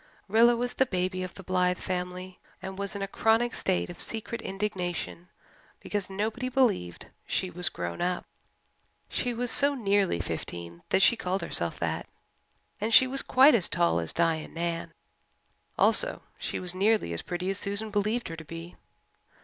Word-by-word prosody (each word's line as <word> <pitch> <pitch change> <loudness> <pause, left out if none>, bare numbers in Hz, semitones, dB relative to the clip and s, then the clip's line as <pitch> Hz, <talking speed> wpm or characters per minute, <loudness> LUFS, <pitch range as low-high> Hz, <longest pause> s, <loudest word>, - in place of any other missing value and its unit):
Rilla 230 +4 +5
was 245 +1 -1
the 265 - +2
"baby" 185 -1 -1
of 185 0 -6
the 195 - -10
Blythe 180 0 +1
family 180 0 -4 0.2
and 190 0 -6
was 200 +1 -4
in 200 - -3
a - - -2
chronic 225 +4 +2
state 185 -2 0
of 175 - -8
secret 225 +1 -3
indignation 185 -3 -3 0.5
because 205 -2 -3
nobody 220 +6 -2
believed 230 - +1 0.2
she 185 -1 -1
was 180 +1 -2
grown 85 -1 -5
up. 180 0 -1 0.8
She 245 - -1
was 240 0 0
so 285 0 +4
nearly 200 - +1
fifteen 85 0 -5
that 190 - +4
she - - +7
called 190 -3 -2
herself - - 0
that, - - -2 0.7
and 220 - 0
she 260 - +8
was 270 +1 -1
quite 270 +3 +6
as 195 -7 +4
tall 85 0 +2
as 80 -1 -3
Di 165 -1 +2
and 155 - -9
Nan; 170 0 -2 0.9
also, - - +3 0.2
she - - -3
was 180 -1 -3
nearly 200 - +2
as 85 - -1
pretty 180 +2 -3
as 195 - -1
Susan 205 +2 -1
believed 215 +4 0
her 165 - -5
to 160 - -9
be. 165 +2 -9
190 Hz, 175 wpm, -28 LUFS, 175-225 Hz, 0.9 s, she